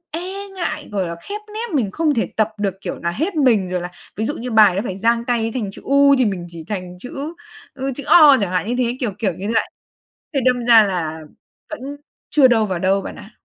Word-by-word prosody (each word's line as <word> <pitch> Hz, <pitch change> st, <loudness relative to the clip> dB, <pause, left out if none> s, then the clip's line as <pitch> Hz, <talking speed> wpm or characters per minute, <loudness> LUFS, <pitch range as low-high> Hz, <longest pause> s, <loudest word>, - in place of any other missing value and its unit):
e 380 Hz, +5 st, -5 dB
ngại, 355 Hz, -2 st, -4 dB
gọi 190 Hz, -3 st, -1 dB
là, 170 Hz, -, -4 dB
khép 415 Hz, +1 st, -6 dB
nép 440 Hz, -6 st, -3 dB
mình 220 Hz, -8 st, 0 dB
không 315 Hz, +2 st, +1 dB
thể 225 Hz, -, 0 dB
tập 220 Hz, -1 st, +2 dB
được, 200 Hz, -2 st, -1 dB
kiểu, 180 Hz, -, -5 dB
nà 170 Hz, -, -2 dB
hết 320 Hz, -, -2 dB
mình 230 Hz, -10 st, +3 dB
rồi 180 Hz, -1 st, -1 dB
là 175 Hz, +1 st, -6 dB, 0.3 s
ví 220 Hz, -, -1 dB
dụ 290 Hz, -, -2 dB
như 245 Hz, +2 st, -5 dB
bài 210 Hz, -5 st, +5 dB
nó 195 Hz, -, 0 dB
phải 190 Hz, -, -4 dB
dang 230 Hz, +2 st, +1 dB
tay 235 Hz, -2 st, 0 dB
thành 215 Hz, -6 st, -2 dB
chữ -, -, -13 dB
U 280 Hz, 0 st, +5 dB
thì 255 Hz, -, +4 dB
mình 185 Hz, -4 st, -3 dB
chỉ 165 Hz, -2 st, -9 dB
thành 180 Hz, -3 st, -5 dB
chữ, 280 Hz, -, -6 dB, 0.4 s
ư, 270 Hz, 0 st, -3 dB
chữ 285 Hz, -, -6 dB
O 300 Hz, -5 st, +8 dB
chẳng 190 Hz, -3 st, -1 dB
hạn 185 Hz, +3 st, 0 dB
như 245 Hz, -, 0 dB
thế, 245 Hz, 0 st, 0 dB
kiểu 235 Hz, -6 st, -1 dB
kiểu 195 Hz, -6 st, 0 dB
như 190 Hz, -, -6 dB
vậy. -, -, +1 dB, 0.7 s
Thế 275 Hz, -, +2 dB
đâm 250 Hz, -1 st, +2 dB
ra 230 Hz, -2 st, +7 dB
là 165 Hz, -5 st, -3 dB, 0.5 s
vẫn 310 Hz, -, -6 dB, 0.5 s
chưa 285 Hz, -3 st, +6 dB
đâu 225 Hz, -3 st, +3 dB
vào 185 Hz, -3 st, -2 dB
đâu 190 Hz, +2 st, +2 dB
bạn -, -, -7 dB
ạ. 210 Hz, -, -12 dB
225 Hz, 245 wpm, -20 LUFS, 190-280 Hz, 0.7 s, O